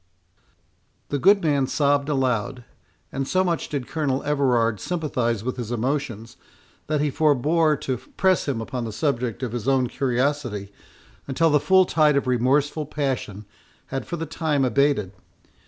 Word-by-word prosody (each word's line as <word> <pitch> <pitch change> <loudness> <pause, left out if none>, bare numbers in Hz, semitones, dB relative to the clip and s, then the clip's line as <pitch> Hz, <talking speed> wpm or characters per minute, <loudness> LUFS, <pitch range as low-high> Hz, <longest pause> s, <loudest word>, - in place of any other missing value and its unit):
The 145 - -1
good 195 +5 +5
man 140 -4 +2
sobbed 145 0 +1
aloud, 125 -3 -1 0.5
and 135 0 -3
so 185 +4 +2
much 170 -3 -1
did 140 -4 -3
Colonel 140 -4 -1
Everard 125 -7 +1
sympathize 125 - -2
with 130 +1 -3
his 120 -2 -5
emotions, 120 -2 -3 0.5
that 150 -1 0
he 150 -1 0
forebore 155 +2 +2
to 130 -3 -2 0.2
press 190 -4 +2
him 130 -5 -1
upon 125 +2 -4
the 110 - -5
subject 125 -2 -1
of 125 - -2
his 120 0 -4
own 135 -2 +3
curiosity 125 -5 -1 0.5
until 160 +4 +2
the 150 - +4
full 190 +4 +4
tide 150 -4 +3
of 140 - +1
remorseful 135 +4 +1
passion 130 -9 -3 0.5
had 135 - -3
for 170 - -4
the 165 - -3
time 155 -3 0
abated. 130 -5 +1
135 Hz, 155 wpm, -23 LUFS, 125-150 Hz, 0.5 s, good